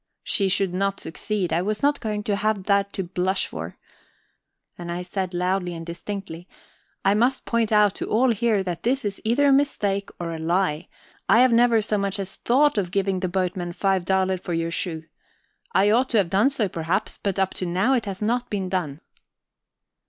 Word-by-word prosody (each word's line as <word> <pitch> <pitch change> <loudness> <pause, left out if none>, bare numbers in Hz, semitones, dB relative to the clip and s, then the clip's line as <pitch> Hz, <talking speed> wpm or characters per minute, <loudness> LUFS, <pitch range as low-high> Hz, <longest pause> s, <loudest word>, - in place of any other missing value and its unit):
She 195 -3 +1
should 190 -1 +1
not 195 +1 -1
succeed; 185 +3 -3
I 170 - +2
was 210 +5 -2
not 290 0 +3
going 210 -1 -3
to 205 -1 0
have 210 -1 0
that 200 0 +1
to 190 - -2
blush 185 +2 -1
for. - - -7 1.0
And 175 -1 -7
I 175 +1 -3
said 185 0 -3
loudly 180 0 -1
and 165 0 -7
distinctly: 175 0 -7 0.6
"I 195 - +5
must 245 +5 +1
point 230 -2 0
out 210 -2 +4
to - - -4
all 240 +3 +3
here 220 -2 +1
that 175 -3 -4
this 260 +2 0
is 200 -1 -3
either 260 +6 +3
a - - +6
mistake 205 -8 +1
or 170 -1 -3
a 165 - -5
lie. 170 -1 0 0.4
I 225 +4 +6
have 255 -2 +5
never 230 -2 +4
so 210 -1 0
much 200 +1 -1
as 195 -1 -5
thought 270 -1 +3
of 185 -3 -2
giving 195 0 0
the 185 -1 -2
boatman 180 -1 -2
five 195 0 +1
daler 190 0 +1
for 175 - -5
your 165 0 -1
shoe. 165 -2 -3 0.7
I 205 - +3
ought 250 +4 +3
to 230 - +1
have 185 -5 +2
done 205 +8 +4
so, 250 -7 0
perhaps, 175 +4 -2
but 200 -2 -1
up 190 -1 +1
to 185 - -3
now 190 +10 +2
it 235 -5 0
has 195 +1 -4
not 240 +3 0
been 195 -3 -2
done." 165 -6 -3
195 Hz, 205 wpm, -24 LUFS, 180-215 Hz, 1.0 s, a